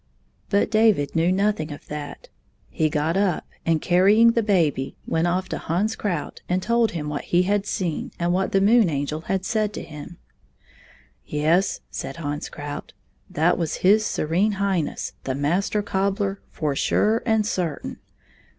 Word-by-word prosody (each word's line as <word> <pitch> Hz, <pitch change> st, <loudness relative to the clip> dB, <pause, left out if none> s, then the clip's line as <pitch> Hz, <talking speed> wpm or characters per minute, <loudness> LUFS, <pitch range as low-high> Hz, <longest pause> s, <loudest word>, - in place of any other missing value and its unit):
But 205 Hz, +1 st, +2 dB
David 215 Hz, -11 st, +3 dB
knew 165 Hz, +2 st, +3 dB
nothing 190 Hz, -5 st, 0 dB
of 145 Hz, -, -9 dB
that. 150 Hz, -1 st, -7 dB, 0.4 s
He 155 Hz, -, +1 dB
got 150 Hz, +3 st, 0 dB
up 195 Hz, -3 st, +1 dB, 0.2 s
and, 165 Hz, -2 st, +2 dB
carrying 200 Hz, +6 st, +5 dB
the 230 Hz, -, +1 dB
baby, 165 Hz, -10 st, +1 dB
went 165 Hz, +1 st, 0 dB
off 185 Hz, +2 st, 0 dB
to -, -, -3 dB
Hans 200 Hz, +7 st, -1 dB
Krout 175 Hz, -8 st, -3 dB
and 180 Hz, +1 st, 0 dB
told 235 Hz, -2 st, +2 dB
him 155 Hz, -3 st, -4 dB
what 150 Hz, -1 st, -4 dB
he 175 Hz, +1 st, +3 dB
had 200 Hz, +2 st, 0 dB
seen 175 Hz, -8 st, -2 dB
and 175 Hz, +1 st, 0 dB
what 190 Hz, +1 st, 0 dB
the 195 Hz, -, +3 dB
Moon 215 Hz, -1 st, +5 dB
Angel 145 Hz, +1 st, -2 dB
had 190 Hz, +3 st, -2 dB
said 215 Hz, -2 st, 0 dB
to -, -, -5 dB
him. 150 Hz, +2 st, -10 dB, 0.6 s
" 65 Hz, +1 st, -26 dB, 0.2 s
Yes," 165 Hz, +6 st, +1 dB
said 135 Hz, -, -5 dB
Hans 145 Hz, -2 st, -4 dB
Krout, 145 Hz, 0 st, -7 dB, 0.2 s
" 65 Hz, -, -40 dB
that 165 Hz, +4 st, +3 dB
was 165 Hz, -3 st, -1 dB
His 210 Hz, +3 st, +6 dB
Serene 190 Hz, +2 st, 0 dB
Highness, 190 Hz, -5 st, -1 dB
the 130 Hz, -, -1 dB
Master 180 Hz, +9 st, 0 dB
Cobbler, 195 Hz, 0 st, -1 dB
for 150 Hz, -3 st, -2 dB
sure 220 Hz, +10 st, +2 dB
and 220 Hz, -2 st, +2 dB
certain. 180 Hz, -7 st, -3 dB
180 Hz, 170 wpm, -23 LUFS, 155-205 Hz, 0.6 s, His